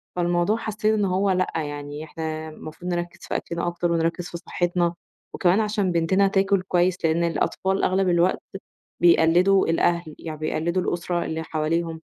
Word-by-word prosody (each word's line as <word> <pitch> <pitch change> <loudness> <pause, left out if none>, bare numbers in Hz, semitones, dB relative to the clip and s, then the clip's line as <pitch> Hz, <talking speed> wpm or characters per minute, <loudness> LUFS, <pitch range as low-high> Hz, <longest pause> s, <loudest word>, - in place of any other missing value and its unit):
فالموضوع 175 +4 +1
حاسّين 215 -1 0
إن 205 -2 +1
هو 190 +1 +1
لأ، 185 0 +1
يعني 145 -1 -4
إحنا 160 0 -5
مفروض 155 +3 -7
نركِّز 175 0 -4
في - - -3
أكلنا 170 0 -3
أكتر 175 0 -1
ونركِّز 165 +1 0
في 170 - -6
صحّتنا، 175 0 -1 0.4
وكمان 185 +3 +3
علشان 210 -3 0
بنتنا 185 +4 +3
تاكل 195 0 +2
كويس، 180 -1 +1
لإن 160 +1 +2
الأطفال 190 +3 0
أغلب 185 0 +2
الوقت 175 +1 +2 0.6
بيقلِّدوا 175 +3 +5
الأهل، 170 -1 +1
يعني 155 -2 -6
بيقلِّدوا 165 +3 -1
الأسرة 175 0 -2
اللي 160 0 -3
حواليهم، 160 +1 -2
175 Hz, 155 wpm, -24 LUFS, 165-185 Hz, 0.6 s, بيقلِّدوا